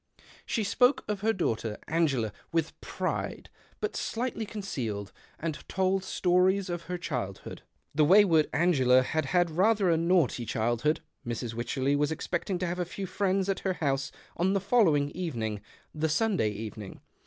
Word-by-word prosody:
She 225 - 0
spoke 245 +6 +3
of 210 -1 -2
her 220 +2 +3
daughter 115 - -2
Angela 135 -10 +1 0.2
with 165 -1 -1
pride - - -4 0.3
but 425 -1 -3
slightly 230 -2 -2
concealed, 115 - -4 0.3
and 155 -3 -3
told 190 0 +1
stories 185 +1 +2
of 175 -1 -4
her 180 +1 -3
childhood. 120 - -5 0.3
The 150 +1 +3
way 190 +7 +7
w^ard 160 -6 +3
Angela 130 -6 +4
had 155 +3 -1
had 175 +4 +2
rather 195 +2 +3
a 165 - +3
naughty 165 -7 +2
childhood. 120 +7 0 0.2
Mrs. 120 -1 -4
AVycherley 130 +4 0
was 145 +1 +1
expecting 175 +4 -2
to 180 - -2
have 175 +1 -3
a - - +1
few 190 +3 -6
friends 190 0 0
at 195 - 0
her 190 - -1
house 140 -5 -1 0.2
on 185 +3 +1
the 195 - +2
following 175 -9 +3
evening 115 - -3 0.2
— - - -35
the 155 +1 -1
Sunday 185 - +2
evening. 105 -1 -7
165 Hz, 165 wpm, -29 LUFS, 130-190 Hz, 0.3 s, way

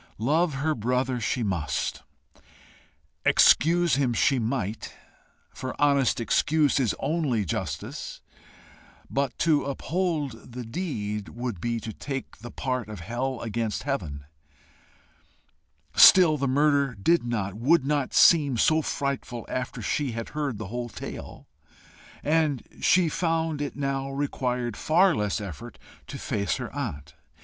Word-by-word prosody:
Love 150 +7 +1
her 155 +4 0
brother 125 +1 -1
she 120 +2 -1
must; 85 -9 -2 1.2
excuse 170 -2 +4
him 130 -4 +1
she 135 +3 +3
might, 110 -3 -3 0.6
for 130 - -6
honest 140 -4 +3
excuse 150 +5 +2
is 120 -6 +1
only 145 -10 0
justice; 80 - -4 0.9
but 140 -2 -1
to 155 -3 +2
uphold 145 - -3
the 125 0 -5
deed 105 - -4
would 120 -7 -5
be 115 +1 -1
to 110 0 -7
take 135 +5 -6
the 120 +3 -9
part 125 -4 -3
of 105 -5 -7
hell 125 +6 -3
against 115 -1 -2
heaven. 80 - -3 1.7
Still 175 -5 +8
the 140 -1 -1
murder 140 -1 +2
did 165 - +2
not, 105 -5 -2
would 135 - +2
not 145 -2 0
seem 145 -7 +5
so 155 +7 +3
frightful 140 -5 -3
after 130 -1 -4
she 140 -5 -1
had 115 0 -5
heard 145 -6 -3
the 105 -2 -6
whole 120 +1 -4
tale, - - -8 0.8
and 150 -3 +1 0.2
she 180 -2 +4
found 165 -2 -1
it 145 - -4
now 135 -1 -2
required 125 -4 -2
far 180 - +3
less 105 0 -1
effort 95 -8 -8 0.3
to - - -7
face 100 -2 -1
her - - -6
aunt. 70 0 -5
130 Hz, 130 wpm, -26 LUFS, 115-150 Hz, 1.7 s, Still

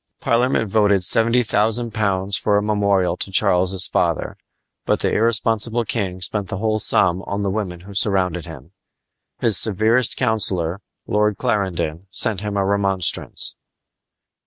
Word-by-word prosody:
Parliament 115 -1 0
voted 100 -2 +2
seventy 115 +4 +4
thousand 115 +2 0
pounds 100 -2 -1
for 105 0 +1
a 105 - 0
memorial 100 -4 0
to - - -2
Charles's 95 -2 +2
father, - - -1 0.5
but - - -1
the - - 0
irresponsible 115 +1 +1
king 95 -5 -3
spent 100 +2 +1
the - - -5
whole 110 +1 -1
sum 95 -3 +2
on 100 +1 -3
the 100 - -1
women 95 -4 -4
who 100 +3 -12
surrounded 95 -4 +1
him. - - -12 0.7
His 110 -5 +2
severest 110 +4 +2
counselor, 100 -7 0 0.2
Lord 105 -1 0
Clarendon, 95 -3 -2
sent 100 0 0
him 105 -1 -4
a 100 - 0
remonstrance. 95 -3 -1
100 Hz, 140 wpm, -20 LUFS, 95-110 Hz, 0.7 s, seventy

